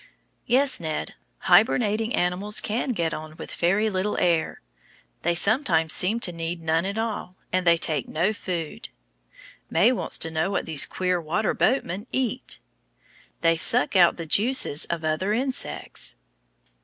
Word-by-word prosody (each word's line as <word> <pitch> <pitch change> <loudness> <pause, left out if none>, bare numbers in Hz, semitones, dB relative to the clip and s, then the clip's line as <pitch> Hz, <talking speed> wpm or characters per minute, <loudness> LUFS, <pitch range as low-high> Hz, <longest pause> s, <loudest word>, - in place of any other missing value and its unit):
Yes, 265 +2 +3
Ned, 155 -2 -4 0.3
hibernating 225 0 +3
animals 185 +4 0
can 235 +5 -2
get 165 -5 -1
on 155 0 -7
with - - -7
very 195 +5 +1
little 205 0 -1
air; 170 -2 +1 0.6
they 175 0 +1
sometimes 175 - +2
seem 210 +6 +1
to 180 - +1
need 165 0 -4
none 165 +2 0
at 200 +2 -4
all, 220 -5 -3 0.2
and 185 -1 0
they 170 0 +6
take 155 -2 +1
no 175 +7 0
food. 175 -6 -5 0.8
May 230 - +4
wants 255 - 0
to 160 - -2
know 160 +3 0
what 200 - -2
these 155 -3 0
queer 180 -1 -1
water 175 +8 -1
boatmen 210 -5 0
eat. 255 -1 -2 0.8
They 165 0 +4
suck 160 +1 +2
out 175 -2 +5
the 165 - -5
juices 200 - +2
of 165 -2 -4
other 155 +6 0
insects. 260 - -2
180 Hz, 150 wpm, -25 LUFS, 165-215 Hz, 0.8 s, they